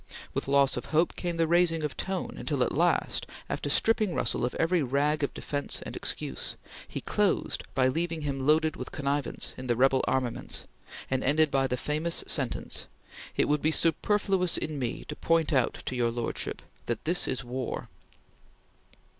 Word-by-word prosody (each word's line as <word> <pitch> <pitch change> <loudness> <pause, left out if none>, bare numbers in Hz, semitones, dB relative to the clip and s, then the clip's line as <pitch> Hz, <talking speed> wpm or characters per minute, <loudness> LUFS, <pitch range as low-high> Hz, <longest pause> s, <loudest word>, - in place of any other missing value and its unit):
With - - -2
loss 140 -1 +4
of - - -4
hope 160 +2 +2
came 175 -2 -3
the 165 -1 +2
raising 170 -1 +3
of 150 - -2
tone, 190 0 -3
until - - 0
at - - 0
last, - - +1 0.2
after - - -3
stripping 215 -5 +2
Russell 115 - 0
of 125 - -1
every 165 +1 +2
rag 145 +3 +1
of 140 - 0
defence 145 -1 -2
and - - -7
excuse, - - -2 0.3
he - - -5
closed - - +1
by 130 -1 +4
leaving 165 +4 -1
him 135 -2 -2
loaded 155 +1 +4
with - - -7
connivance 140 0 -1
in 130 - -6
the 120 - +2
rebel 135 +2 +4
armaments, 130 -3 -1 0.5
and 130 -1 +1
ended 150 +2 +3
by 135 -1 +2
the 125 - -1
famous 155 +5 -1
sentence: - - -1 0.5
"It - - +3
would 150 0 +2
be 155 - +3
superfluous 180 +3 +2
in 150 -2 -3
me 125 -3 -3
to - - -5
point 165 -1 +2
out 130 -3 +1
to 130 - -2
your 120 -1 +2
lordship 115 0 -3 0.2
that 120 -2 -2
this 175 +3 +1
is 130 - -1
war!" 125 +1 -4
150 Hz, 175 wpm, -29 LUFS, 130-165 Hz, 0.5 s, loss